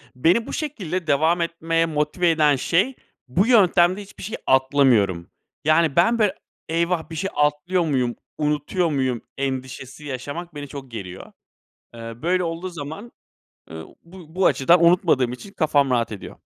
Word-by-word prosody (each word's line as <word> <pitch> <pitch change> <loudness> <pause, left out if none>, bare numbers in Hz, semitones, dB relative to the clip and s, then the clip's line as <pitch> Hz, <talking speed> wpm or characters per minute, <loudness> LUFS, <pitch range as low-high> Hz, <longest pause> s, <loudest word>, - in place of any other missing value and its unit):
Beni 170 - +2
bu - - -6
şekilde 185 - -4
devam 160 +4 +2
etmeye 165 0 0
motive 155 +3 0
eden 150 -3 +3
şey, 190 - +1 0.3
bu 185 - +1
yöntemde 190 -4 +4
hiçbir 200 - -12
şey 220 +4 -5
atlamıyorum. 130 -10 +3 0.4
Yani 155 -2 +3
ben 230 +7 +3
böyle 205 -2 +2 0.3
"Eyvah! 170 0 -1
Bir 160 - -7
şey 190 +4 -2
atlıyor 150 +5 +1
muyum, 125 -5 0 0.2
unutuyor 150 +4 0
muyum?" 130 -4 -1 0.2
endişesi 130 +1 -5
yaşamak 145 +5 -6
beni 145 -1 -6
çok 135 -3 -9
geriyor. 95 -5 -8 0.6
Eee, 115 0 -8
böyle 180 +2 +1
olduğu 170 +2 -4
zaman, 160 +8 -8 0.6
ııı, 80 0 -8 0.2
bu 170 -1 -15
bu 190 - +1
açıdan 170 +5 +4
unutmadığım 130 -8 +3
için 195 +10 -10
kafam 145 -4 +2
rahat 120 -3 0
ediyor. 100 - -8
160 Hz, 150 wpm, -22 LUFS, 135-180 Hz, 0.6 s, yöntemde